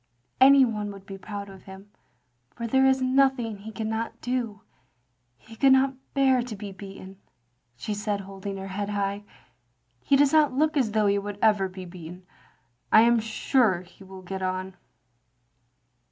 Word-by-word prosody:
" 120 +1 -45
" - - -40
Any 275 0 +8
one 210 -3 -3
would 195 -1 -12
be 195 0 -9
proud 200 +1 -7
of 195 -1 -14
him, 195 +1 -12 0.6
for 235 - -5
there 265 +3 +3
is 265 0 +2
nothing 255 -4 +2
he 215 +2 -9
cannot 220 +2 -4
do. 235 -5 -3 0.8
He 225 - -15
could 270 +3 +5
never 265 0 +3 0.2
bear 265 -2 +4
to 240 -2 -6
be 200 0 -7
beaten, 195 0 -11 0.3
" 120 0 -47
she 210 +12 -4
said, 205 -1 -2
holding 195 0 -7
her 195 0 -7
head 200 +2 -4
high. 200 0 -2 0.8
"He 280 - +3
does 280 +1 +4
not 305 -4 +4
look 305 +4 +1
as 245 -7 +1
though 215 -1 +2
he 200 0 +2
would 205 0 -6
ever 205 -3 +3
be 185 0 -9
beaten. 175 0 -11 0.7
I 215 - +8
am 235 0 +4
stu^ 220 -4 +1
he 180 +2 -17
will 190 0 -12
get 190 +1 -6
on. 185 0 -3
205 Hz, 180 wpm, -26 LUFS, 190-245 Hz, 0.8 s, Any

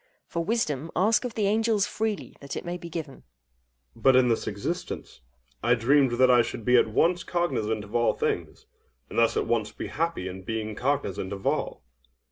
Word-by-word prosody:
For 170 - -3
wisdom, 165 - -1
ask 215 +8 +3
of 240 - -5
the 215 - +1
angels 215 0 +2
freely, 220 -1 -3
that 140 - -7
it - - -5
may 175 0 -3
be 170 -1 -8
given! 160 -5 -6
OINOS. - - -21 0.7
But 135 -1 +4
in 130 -1 +5
this 115 - 0
existence, 100 - -5 0.4
I 120 +3 +4
dreamed 130 +2 +3
that 125 +1 +5
I 120 -1 +6
should 115 -1 -5
be 125 - +4
at 120 - +5
once 170 +10 +2
cognizant 110 -13 -1
of 105 +2 -13
all 120 0 +3
things, - - -3 0.5
and - - 0
thus 115 -1 +3
at - - +1
once 110 -3 0
be - - -6
happy 165 - -2
in 95 +1 -7
being 110 +2 -3
cognizant 105 -7 -1
of 100 -1 -6
all. - - -1
130 Hz, 195 wpm, -27 LUFS, 110-175 Hz, 0.7 s, I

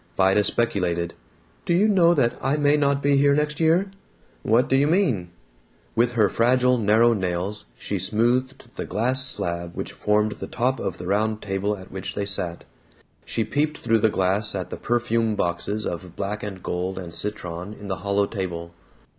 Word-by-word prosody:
Vida 95 +2 +4
speculated, 90 -7 0 0.5
"Do 170 - +1
you 200 +5 +4
know 175 -5 +4
that 120 -6 +2
I 135 +3 +1
may 145 0 +4
not 140 -1 +1
be 140 0 +4
here 140 0 +4
next 150 0 -1
year?" 170 +4 +3 0.5
"What 115 +4 +3
do 135 - +2
you 140 +2 +3
mean?" 150 - +1 0.7
With 120 +1 +2
her 110 -4 +4
fragile 125 +3 +3
narrow 115 +2 +4
nails 95 +1 -3
she 100 - -3
smoothed 120 +6 0
the - - -3
glass 125 +6 0
slab 85 -9 -3
which - - -5
formed 105 +1 +1
the - - -7
top 125 +1 0
of - - -3
the 90 - -7
round 105 +3 0
table 100 +1 -1
at 95 - -12
which 95 0 -5
they 100 - -1
sat. 90 -4 -3 0.6
She 115 - -1
peeped 150 +7 -1
through 115 -1 +1
the 110 - +3
glass 100 +2 +1
at 95 -2 -4
the - - -4
perfume 115 -2 0
boxes 100 +4 -2
of 85 0 -5
black 105 +1 -3
and 95 -3 -7
gold 90 +2 -3
and 90 -3 -7
citron 90 -1 -4
in 105 - -10
the 95 -2 -2
hollow 100 +3 +1
table. 85 -5 -5
105 Hz, 180 wpm, -24 LUFS, 95-130 Hz, 0.7 s, Vida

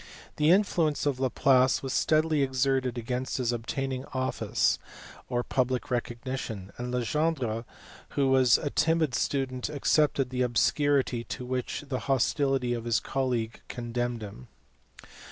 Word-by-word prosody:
The 150 +1 +3
influence 170 -6 +2
of 140 -3 0
Laplace 130 0 +3
was 135 - -3
steadily 155 -1 +2
exerted 130 -1 +1
against 125 +2 -3
his 125 -2 0
obtaining 130 +3 -3
office 130 0 0 0.5
or 120 -1 0
public 130 0 -1
recognition, 120 -4 -4
and 125 0 -3
Legendre 125 -1 -1 0.5
who 140 -1 +3
was 130 -2 +5
a 145 - -3
timid 160 -3 +2
student 130 0 -1
accepted 145 -2 +1
the 125 0 -1
obscurity 130 0 +2
to 125 - -6
which 125 0 -3
the 130 -2 -2
hostility 135 -1 +1
of 120 -1 -4
his 115 -3 +2
colleague 125 -4 -2
condemned 120 -1 -3
him. 100 -12 -9
130 Hz, 130 wpm, -28 LUFS, 120-140 Hz, 0.5 s, was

